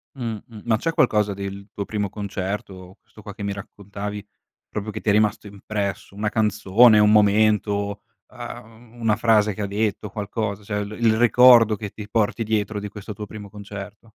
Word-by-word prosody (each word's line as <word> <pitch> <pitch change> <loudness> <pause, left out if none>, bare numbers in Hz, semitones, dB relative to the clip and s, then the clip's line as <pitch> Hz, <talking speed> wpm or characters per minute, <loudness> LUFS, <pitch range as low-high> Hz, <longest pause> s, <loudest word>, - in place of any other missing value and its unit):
Mh-mh, 115 -3 -6
ma 110 -2 +2
c'è 165 +8 -1
qualcosa 105 -6 +2
del 100 +1 -7
tuo 100 - -4
primo 105 -2 -2
concerto, 95 -2 -5
questo 105 - -18
qua 100 -1 -9
che 105 - -7
mi 100 0 -2
raccontavi 100 0 -7 0.4
proprio 105 +1 -5
che 110 - -6
ti 105 - -1
è - - +6
rimasto 105 0 +1
impresso, 100 -1 -5
una 105 +1 -1
canzone, 110 +1 +4
un 105 0 +5
momento, 105 -1 +2 0.3
ehm, 115 +2 -11
una 110 -2 +2
frase 110 -3 +3
che 105 - -6
ha 100 - -1
detto, 105 0 -2
qualcosa, 105 -1 -4
cioè 105 0 -2
l 100 - -8
il 115 -2 +3
ricordo 120 -1 +6
che 105 0 -6
ti 105 -1 -9
porti 115 +1 0
dietro 105 -1 -1
di 105 - -5
questo 105 0 -8
tuo 105 +1 -7
primo 105 -2 -9
concerto? 105 +1 -9
105 Hz, 180 wpm, -23 LUFS, 100-110 Hz, 0.4 s, è